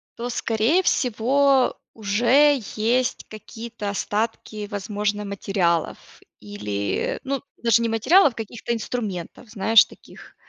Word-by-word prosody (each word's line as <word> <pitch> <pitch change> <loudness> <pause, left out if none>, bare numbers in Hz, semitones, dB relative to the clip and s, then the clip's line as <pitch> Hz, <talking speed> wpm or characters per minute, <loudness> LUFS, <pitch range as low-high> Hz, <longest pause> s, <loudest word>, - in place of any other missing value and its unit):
то, 240 +1 -5
скорее 235 +10 +1
всего, 265 +1 +2 0.2
уже 240 +7 +3 0.2
есть 240 +4 0
какие-то 220 -1 -7
остатки, 210 0 -3
возможно, 205 0 -2
материалов, 190 -4 -2 0.2
или, 100 -1 -3
ну, 275 -1 -3 0.2
даже 230 -1 +2
не 230 - 0
материалов, 260 - +4
каких-то 230 +1 -5
инструментов, 215 -2 -5
знаешь, 220 +1 +5
таких, - - -16
225 Hz, 105 wpm, -23 LUFS, 205-245 Hz, 0.2 s, знаешь